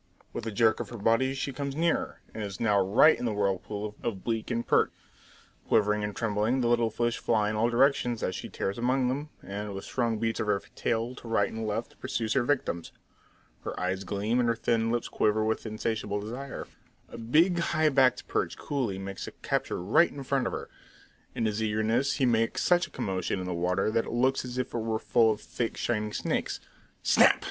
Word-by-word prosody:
With 115 Hz, -, -4 dB
a -, -, -2 dB
jerk 110 Hz, +2 st, +3 dB
of 115 Hz, -4 st, -4 dB
her 120 Hz, -, -7 dB
body 115 Hz, +6 st, +2 dB
she 135 Hz, 0 st, -3 dB
comes 140 Hz, +1 st, -4 dB
nearer, 165 Hz, +2 st, 0 dB
and 110 Hz, -, -5 dB
is 100 Hz, -1 st, -6 dB
now 105 Hz, -3 st, +3 dB
right 105 Hz, +11 st, +6 dB
in -, -, -2 dB
the 115 Hz, -, 0 dB
whirlpool 105 Hz, +1 st, -2 dB
of 105 Hz, -5 st, -3 dB
bleak 115 Hz, -2 st, -2 dB
and 120 Hz, -1 st, -1 dB
perch. -, -, +3 dB, 0.8 s
Quivering 105 Hz, -1 st, +3 dB
and 105 Hz, -1 st, -3 dB
trembling, 115 Hz, +3 st, +1 dB
the 120 Hz, -, +2 dB
little 120 Hz, -1 st, +3 dB
fish 120 Hz, +1 st, -1 dB
fly 105 Hz, -2 st, +1 dB
in -, -, -3 dB
all 115 Hz, +2 st, +2 dB
directions 120 Hz, -2 st, +2 dB
as 95 Hz, -, 0 dB
she -, -, -6 dB
tears 100 Hz, +4 st, -3 dB
among 125 Hz, +1 st, +2 dB
them, 145 Hz, +4 st, -3 dB
and 100 Hz, 0 st, -5 dB
with 95 Hz, -, -6 dB
strong 115 Hz, -3 st, 0 dB
beats 115 Hz, +1 st, -1 dB
of -, -, -1 dB
her 100 Hz, -1 st, +2 dB
tail 115 Hz, +1 st, -1 dB
to 125 Hz, -, -11 dB
right 115 Hz, -, +1 dB
and 110 Hz, 0 st, -4 dB
left 110 Hz, +3 st, -4 dB
pursues 120 Hz, -4 st, -1 dB
her 135 Hz, -, +3 dB
victims. 120 Hz, -, -1 dB, 0.7 s
Her -, -, -5 dB
eyes 95 Hz, +1 st, -1 dB
gleam, 105 Hz, +5 st, 0 dB
and 120 Hz, -1 st, +2 dB
her 115 Hz, -, +2 dB
thin 115 Hz, 0 st, +1 dB
lips 120 Hz, 0 st, -1 dB
quiver 110 Hz, 0 st, +1 dB
with 110 Hz, +1 st, -1 dB
insatiable 110 Hz, -1 st, -2 dB
desire. 125 Hz, +6 st, -6 dB, 0.4 s
A -, -, -9 dB
big, 160 Hz, +10 st, +3 dB
high 155 Hz, -2 st, +2 dB
backed 135 Hz, -2 st, +3 dB
perch -, -, -1 dB
coolie 125 Hz, -9 st, -2 dB
makes 95 Hz, 0 st, -6 dB
a -, -, -6 dB
capture -, -, -1 dB
right 115 Hz, -, +4 dB
in 140 Hz, -, -7 dB
front 135 Hz, 0 st, 0 dB
of -, -, -2 dB
her. -, -, -4 dB, 0.7 s
In 115 Hz, -, 0 dB
his 110 Hz, 0 st, -1 dB
eagerness 110 Hz, +5 st, +1 dB
he 135 Hz, -, +2 dB
makes 115 Hz, -2 st, +1 dB
such 175 Hz, 0 st, +3 dB
a -, -, -19 dB
commotion 95 Hz, 0 st, -2 dB
in 90 Hz, -, -4 dB
the 90 Hz, -, -2 dB
water 90 Hz, +4 st, 0 dB
that 115 Hz, 0 st, +1 dB
it -, -, -6 dB
looks 130 Hz, +3 st, +2 dB
as 125 Hz, 0 st, -6 dB
if 125 Hz, -, -2 dB
it 120 Hz, -, -1 dB
were 110 Hz, 0 st, -1 dB
full 115 Hz, 0 st, +3 dB
of 110 Hz, -1 st, -1 dB
thick, 115 Hz, -2 st, -3 dB
shining 105 Hz, -3 st, -1 dB
snakes. -, -, -2 dB, 0.4 s
Snap! -, -, +6 dB
115 Hz, 215 wpm, -28 LUFS, 105-125 Hz, 0.8 s, right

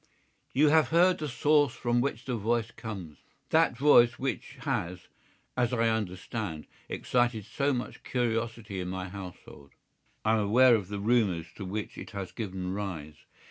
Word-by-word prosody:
"You 145 Hz, +3 st, +4 dB
have 155 Hz, -2 st, +5 dB
heard 175 Hz, +5 st, +4 dB
the 150 Hz, -1 st, -3 dB
source 145 Hz, +1 st, +3 dB
from 120 Hz, 0 st, +1 dB
which 125 Hz, -2 st, -2 dB
the 125 Hz, -, -1 dB
voice 115 Hz, +1 st, 0 dB
comes—that 110 Hz, -, -2 dB
voice 120 Hz, -4 st, +6 dB
which 130 Hz, -7 st, -4 dB
has, 90 Hz, +1 st, -3 dB, 0.5 s
as 125 Hz, -1 st, +1 dB
I 115 Hz, -1 st, +3 dB
understand, 95 Hz, -4 st, -3 dB, 0.2 s
excited 120 Hz, -4 st, 0 dB
so 140 Hz, +5 st, 0 dB
much 125 Hz, -2 st, -4 dB
curiosity 115 Hz, -4 st, -2 dB
in 90 Hz, -, -3 dB
my 90 Hz, 0 st, -4 dB
household. 90 Hz, -7 st, -10 dB, 0.5 s
I 110 Hz, -, +4 dB
am 110 Hz, -, +3 dB
aware 120 Hz, +5 st, +5 dB
of 105 Hz, -5 st, +1 dB
the 100 Hz, +1 st, -4 dB
rumours 100 Hz, -6 st, +2 dB
to 100 Hz, -, -5 dB
which 105 Hz, +3 st, -5 dB
it -, -, -8 dB
has 95 Hz, -2 st, -5 dB
given 95 Hz, -4 st, -4 dB
rise. 85 Hz, -7 st, -5 dB
115 Hz, 155 wpm, -29 LUFS, 95-125 Hz, 0.5 s, voice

